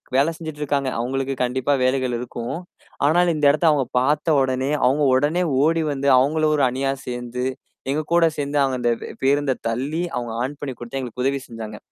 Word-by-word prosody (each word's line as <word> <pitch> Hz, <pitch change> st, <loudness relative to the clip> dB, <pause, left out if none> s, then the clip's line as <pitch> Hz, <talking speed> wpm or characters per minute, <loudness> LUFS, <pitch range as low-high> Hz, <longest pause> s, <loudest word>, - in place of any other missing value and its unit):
வேலை 145 Hz, +5 st, +3 dB
செஞ்சுட்டு 155 Hz, -2 st, -7 dB
இருக்காங்க. 140 Hz, -2 st, 0 dB
அவங்களுக்கு 135 Hz, +2 st, -2 dB
கண்டிப்பா 130 Hz, +3 st, 0 dB
வேலைகள் 130 Hz, -1 st, +1 dB
இருக்கும். 120 Hz, +1 st, -5 dB, 0.5 s
ஆனால், 175 Hz, +3 st, +3 dB
இந்த 150 Hz, -1 st, 0 dB
இடத்த 155 Hz, +3 st, +1 dB
அவங்க 140 Hz, -4 st, +1 dB
பார்த்தவுடனே, 135 Hz, -1 st, +1 dB
அவங்க 145 Hz, +4 st, +3 dB
உடனே 150 Hz, +7 st, +2 dB, 0.2 s
ஓடி 165 Hz, +1 st, +2 dB
வந்து, 140 Hz, 0 st, 0 dB
அவங்களும் 155 Hz, +3 st, +2 dB
ஒரு 140 Hz, -, +2 dB
அணியா 135 Hz, +2 st, -1 dB
சேர்ந்து, 125 Hz, 0 st, -4 dB, 0.5 s
எங்க 150 Hz, -, 0 dB
கூட 170 Hz, -1 st, +5 dB
சேர்ந்து 145 Hz, 0 st, -2 dB
அவங்க 130 Hz, -2 st, 0 dB
அந்த 120 Hz, -, +2 dB, 0.3 s
பேருந்தை 140 Hz, -1 st, +2 dB
தள்ளி, 140 Hz, +9 st, -2 dB
அவங்க 120 Hz, -2 st, -3 dB
ஆன் 140 Hz, +2 st, -5 dB
பண்ணி 135 Hz, -3 st, -4 dB
கொடுத்து 120 Hz, +3 st, -5 dB
எங்களுக்கு 125 Hz, 0 st, -5 dB
உதவி 140 Hz, 0 st, +1 dB
செஞ்சாங்க. 110 Hz, -3 st, -7 dB
135 Hz, 170 wpm, -22 LUFS, 125-150 Hz, 0.5 s, கூட